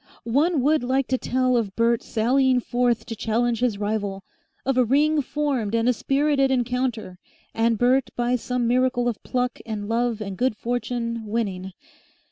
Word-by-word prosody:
One 285 +5 +1
would 305 +2 +3
like 260 +2 +1
to 260 - +2
tell 255 0 +1
of 215 -5 -1
Bert 230 0 +2
sallying 255 +3 +2
forth 245 -1 0
to 225 - -6
challenge 230 +2 0
his 240 -4 0
rival, 205 -2 -2 0.4
of 270 0 +1
a 255 - +4
ring 295 +5 +2
formed 265 -6 -1
and 230 +1 +1
a 250 - +4
spirited 275 +2 +1
encounter, 245 -6 -1 0.3
and 230 0 +1
Bert 250 +3 +2
by 240 +1 +1
some 250 0 -2
miracle 250 0 +2
of 235 -4 -2
pluck 250 -1 -2
and 210 -2 -5
love 230 0 0
and 200 -3 -5
good 250 -3 +1
fortune 235 -1 -3
winning. 195 -4 -3
245 Hz, 165 wpm, -24 LUFS, 225-255 Hz, 0.4 s, a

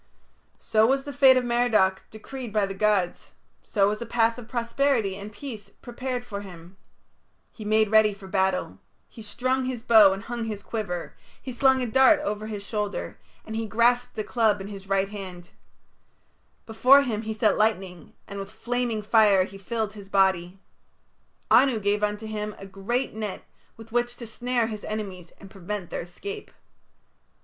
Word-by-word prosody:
So 220 0 +2
was 270 +2 +1
the 285 - -7
fate 260 0 +6
of 255 - +1
Merodach 235 -6 +2
decreed 240 +2 -8
by 210 -1 +2
the 195 - -5
gods; 195 -3 0 0.3
so 200 -3 +1
was 215 +2 -3
a - - -3
path 230 0 +1
of 230 - -11
prosperity 235 -3 0
and 200 +2 -8
peace 215 -3 -8
prepared 245 +3 -6
for 200 -4 -6
him. 180 -2 -12 0.8
He 220 - -10
made 215 0 +2
ready 215 -1 +6
for 195 -1 -12
battle; 190 -1 0 0.3
he 230 - -12
strung 255 +5 -1
his 250 -3 -4
bow 220 -5 +7
and 195 +2 -4
hung 235 -1 -4
his 210 -2 -5
quiver; 180 -6 -4 0.2
he 260 - -7
slung 265 +1 +3
a - - 0
dart 265 +5 +5
over 215 -6 -3
his 210 -2 -6
shoulder, 210 0 -4 0.3
and 220 - -6
he 225 0 -2
grasped 235 +3 +2
a 215 - -1
club 220 -3 +1
in 195 +1 -7
his 195 -1 -10
right 195 0 +1
hand; 185 -4 -9 1.1
before 255 +5 +5
him 220 -5 -2
he 220 0 -4
set 215 -1 +2
lightning, 190 -6 -1
and 200 0 -7
with 195 0 -6
flaming 240 -2 -2
fire 210 -3 +5
he 195 +1 -9
filled 220 +1 -3
his 200 -2 -12
body. 190 -2 +2 0.9
Anu 260 -5 +5
gave 205 0 0
unto 210 +1 -1
him 210 -1 -4
a 195 - -10
great 205 +7 -2
net 215 -3 -5 0.3
with 225 0 -13
which 240 +1 -1
to 235 - -8
snare 240 +1 -1
his 215 -2 -6
enemies 195 -5 -5
and 195 -1 -13
prevent 195 -1 -6
their - - -3
escape. 405 - -8
215 Hz, 175 wpm, -25 LUFS, 195-240 Hz, 1.1 s, bow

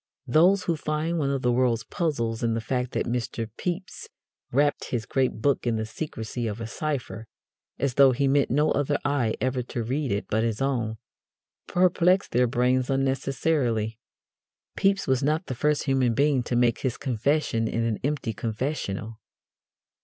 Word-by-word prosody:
Those 175 +9 +4
who 170 - 0
find 155 +2 -2
one 140 -2 0
of 135 -1 -1
the 125 - +3
world's 120 -2 +2
puzzles 115 -5 -2
in 115 -1 +1
the - - 0
fact 125 +2 -2
that - - 0
Mr. 115 -1 -2
Pepys 180 +1 -5 0.4
wrapped 145 +3 +2
his 115 -3 -3
great 130 -4 -1
book 140 -3 +1
in 115 - +2
the 110 0 -2
secrecy 115 -2 -5
of 105 +1 -4
a 115 - -4
cipher, 120 -4 -4 0.5
as 135 -1 0
though 135 0 +6
he 135 +3 +1
meant 140 +1 +3
no 150 +4 +2
other 145 0 +1
eye 135 -6 +1
ever 130 0 0
to 120 -1 -4
read 135 +3 -1
it 100 +1 -1
but 110 - +1
his 115 -2 -1
own, 120 -5 -1 0.7
perplex 180 +1 +3
their 125 +1 +2
brains 125 +2 +1
unnecessarily. 135 -4 0 0.8
Pepys 195 0 +2
was 130 -1 +1
not 155 +5 +1
the 130 - -4
first 150 +4 +1
human 130 -4 +1
being 140 -1 +3
to 120 0 -3
make 120 -1 +3
his 130 -4 -2
confession 125 -2 0
in 115 +1 -1
an 115 -2 -1
empty 140 -5 -1
confessional. 110 -2 -3
130 Hz, 170 wpm, -26 LUFS, 115-145 Hz, 0.8 s, though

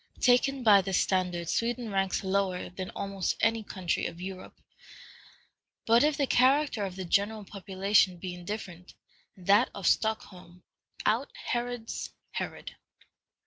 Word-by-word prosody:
Taken 260 +1 +3
by 205 -3 +7
this 190 0 0
standard, 180 -2 0
Sweden 235 +3 -1
ranks 195 0 0
lower 190 -2 -1
than 185 0 -6
almost 195 -2 -2
any 225 0 +2
country 185 -4 -2
of 170 - -9
Europe. 185 0 -8 1.3
But 230 +3 +5
if 300 -1 +2
the 285 - +2
character 265 -2 +3
of 185 -2 -6
the 190 -1 -5
general 205 +4 0
population 195 -1 +1
be 180 +1 -6
indifferent, 180 -1 -7 0.4
that 200 +6 +4
of 200 - -6
Stockholm 180 -5 -1 0.4
"out - - +1
Herods 240 - -4 0.2
Herod." - - -5
200 Hz, 130 wpm, -29 LUFS, 185-230 Hz, 1.3 s, by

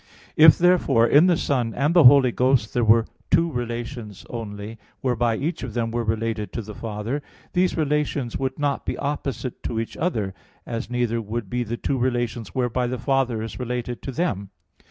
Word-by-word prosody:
If 155 0 +8
therefore 170 -10 +4
in 145 +8 +6
the 175 -3 +3
Son 125 -8 -1
and 145 +5 +1
the 175 -5 +6
Holy 130 -1 +8
Ghost 125 -3 +1
there 120 - +1
were 115 +1 +5 0.2
two 165 0 +3
relations 120 -4 -5
only, 110 -1 -6 0.2
whereby 120 -3 +1
each 160 +8 -3
of - - -6
them 115 -1 -1
were 120 0 -1
related 110 -1 -2
to 115 - -3
the 105 +1 -9
Father, 110 +6 -4 0.3
these 180 0 +1
relations 150 -5 -1
would 130 -1 -2
not 145 -2 -1
be - - -3
opposite 140 -3 -4
to 115 - -3
each 115 - -5
other, 110 - -1 0.3
as 115 0 -4
neither 120 -2 0
would 110 -1 -5
be 125 0 0
the 120 +1 -4
two 135 +1 -1
relations 120 -3 -2
whereby 125 -1 0
the 125 +1 -3
Father 125 -3 0
is 115 - -7
related 125 -1 -4
to 135 - -5
them. 120 - -2
120 Hz, 185 wpm, -23 LUFS, 115-140 Hz, 0.3 s, If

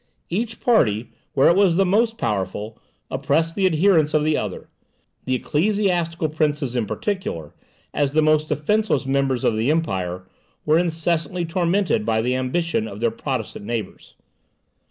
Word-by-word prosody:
Each 225 +5 -2
party, 120 - +2 0.2
where 135 - +5
it 170 - +5
was 190 -4 +4
the 195 - +4
most 225 +4 +2
powerful, 105 - -3 0.3
oppressed 145 +5 0
the 195 0 +2
adherents 160 -3 +3
of 150 - +3
the 155 0 +2
other; 105 -8 -4 0.6
the 130 - +1
ecclesiastical 170 +1 0
princes 150 -4 -1
in 115 -4 0
particular, 140 - -4 0.4
as 145 -2 +1
the 155 0 +3
most 155 0 +3
defenceless 180 -2 0
members 135 -2 0
of - - +2
the 110 +5 0
empire, 95 - -1 0.4
were 155 +2 +4
incessantly 170 0 -1
tormented 175 - +1
by 110 0 +1
the 125 +2 0
ambition 170 - -1
of - - -8
their 235 - +1
Protestant 130 - -4
neighbours. 115 -3 -5
155 Hz, 150 wpm, -22 LUFS, 125-180 Hz, 0.6 s, where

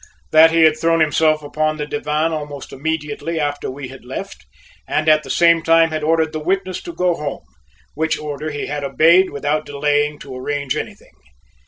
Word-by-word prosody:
That 160 +1 +7
he 165 0 +3
had 155 0 +4
thrown 165 0 +2
himself 155 0 +2
upon 155 +1 -1
the 150 - -3
divan 155 -3 -1
almost 145 -3 -6
immediately 160 +2 -3
after 145 -1 -2
we 130 0 -7
had 130 -2 -12
left, 135 +11 -8 0.4
and 155 - -1
at 155 0 +5
the 135 - -12
same 170 +3 +4
time 165 0 +4
had 155 0 -2
ordered 160 0 +1
the 155 - -3
witness 185 +3 -2
to 345 - -7
go 180 - +1
home, 145 - -5 0.5
which 160 +2 -1
order 150 0 -5
he 145 -1 -4
had 145 0 -4
obeyed 165 +7 +4
without 145 +2 -1
delaying 145 +1 0
to 135 -3 -10
arrange 140 +1 -3
anything. - - -7
155 Hz, 185 wpm, -19 LUFS, 145-165 Hz, 0.5 s, That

